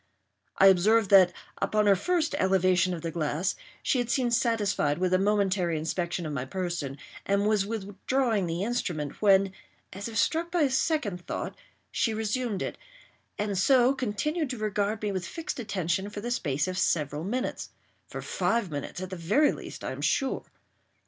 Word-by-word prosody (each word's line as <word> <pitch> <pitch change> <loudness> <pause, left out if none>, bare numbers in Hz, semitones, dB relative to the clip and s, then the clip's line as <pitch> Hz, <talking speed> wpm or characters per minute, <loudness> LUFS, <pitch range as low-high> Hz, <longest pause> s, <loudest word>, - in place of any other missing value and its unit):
I 195 - +6
observed 200 +3 +5
that, 185 -3 +8 0.3
upon 215 0 +2
her 200 -1 +6
first 325 - 0
elevation 185 -1 +3
of 165 - -8
the 165 - -2
glass, 165 +3 -1 0.3
she 260 - +2
had 245 -1 -1
seemed 245 -2 +1
satisfied 210 - +1
with 185 0 0
a 185 - +4
momentary 195 -4 +1
inspection 170 +2 -2
of 150 - -4
my 125 -3 -2
person, 165 -2 -3 0.3
and 200 +1 +1
was 210 -2 +2
withdrawing 215 +1 -1
the 170 +3 -2
instrument, 180 - -3
when, 195 -2 +4 0.4
as 200 +3 -5
if 225 -1 -5
struck 330 +9 +1
by 345 -1 0
a 275 - +2
second 260 - 0
thought, - - -4 0.4
she 225 -2 0
resumed 220 -1 -1
it, - - -5 0.6
and 205 -2 -1
so 255 +4 +5
continued 275 - -2
to 250 - -4
regard 210 0 -1
me 210 - 0
with 185 -2 -3
fixed 325 - -5
attention 195 -3 -1
for 205 - -7
the 240 +4 -4
space 150 - 0
of 185 0 -2
several 150 -1 0
minutes—for 250 +8 -6
five 230 -6 0
minutes, 145 +5 -5
at 185 0 -6
the - - -3
very 205 - +3
least, - - -8
I - - -3
am - - -6
sure. 270 -2 0
200 Hz, 175 wpm, -28 LUFS, 180-230 Hz, 0.6 s, that